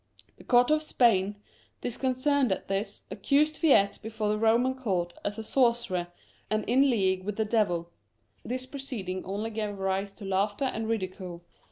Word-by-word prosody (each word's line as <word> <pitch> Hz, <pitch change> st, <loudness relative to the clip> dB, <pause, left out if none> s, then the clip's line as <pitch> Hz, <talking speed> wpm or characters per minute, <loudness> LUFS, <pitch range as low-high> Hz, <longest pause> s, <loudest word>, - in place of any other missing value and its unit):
The -, -, -14 dB
court 245 Hz, +2 st, +4 dB
of 305 Hz, 0 st, +3 dB
Spain, 210 Hz, -9 st, +2 dB, 0.5 s
disconcerted 255 Hz, +1 st, +1 dB
at 190 Hz, -, -2 dB
this, 195 Hz, +2 st, -3 dB
accused 300 Hz, +2 st, +2 dB
Viete 265 Hz, -, +4 dB
before 220 Hz, -1 st, -3 dB
the 210 Hz, -, +1 dB
Roman 230 Hz, +4 st, +3 dB
court 185 Hz, -9 st, -2 dB
as 205 Hz, +1 st, -3 dB
a 220 Hz, -, -4 dB
sorcerer 235 Hz, -7 st, +1 dB, 0.4 s
and 215 Hz, -1 st, 0 dB
in 270 Hz, +4 st, +4 dB
league 190 Hz, -5 st, +1 dB
with 210 Hz, +1 st, -3 dB
the 220 Hz, -, 0 dB
devil. 175 Hz, -6 st, 0 dB, 0.5 s
This 255 Hz, +1 st, -3 dB
proceeding 250 Hz, -9 st, -5 dB
only 205 Hz, +4 st, -3 dB
gave 210 Hz, -2 st, -3 dB
rise 195 Hz, +1 st, -1 dB
to 205 Hz, -, -10 dB
laughter 200 Hz, +6 st, 0 dB
and 225 Hz, -3 st, -2 dB
ridicule. 185 Hz, -5 st, -4 dB
215 Hz, 160 wpm, -28 LUFS, 195-250 Hz, 0.5 s, court